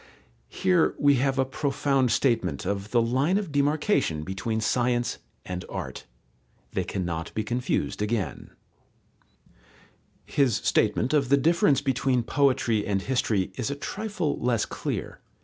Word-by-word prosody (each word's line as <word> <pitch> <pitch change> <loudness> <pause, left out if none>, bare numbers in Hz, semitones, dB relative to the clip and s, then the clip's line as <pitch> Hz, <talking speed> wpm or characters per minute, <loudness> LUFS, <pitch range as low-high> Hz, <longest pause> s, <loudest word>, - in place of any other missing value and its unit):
Here 185 -3 +2
we 145 -2 +4
have 135 +1 +1
a 135 - +3
profound 135 -2 0
statement 110 - +1
of 100 0 -2
the 120 0 +3
line 135 +11 +1
of 200 -6 -3
demarcation 145 - +1
between 95 +5 -3
science 120 +2 0 0.3
and 90 0 -5
art. - - -6 0.6
They - - -1
cannot 85 -3 -3
be 110 - 0
confused 120 -2 -2
again. 105 -3 -2 1.8
His 135 -6 +2
statement 120 +5 +1
of 140 -4 +2
the 140 - +5
difference 150 -1 +3
between 135 -2 +1
poetry 120 -4 +2
and 100 -2 -1
history 110 -7 0
is 125 -2 -2
a 140 - -2
trifle 190 0 -3
less 120 -3 +1
clear. - - -5
125 Hz, 130 wpm, -26 LUFS, 110-140 Hz, 1.8 s, the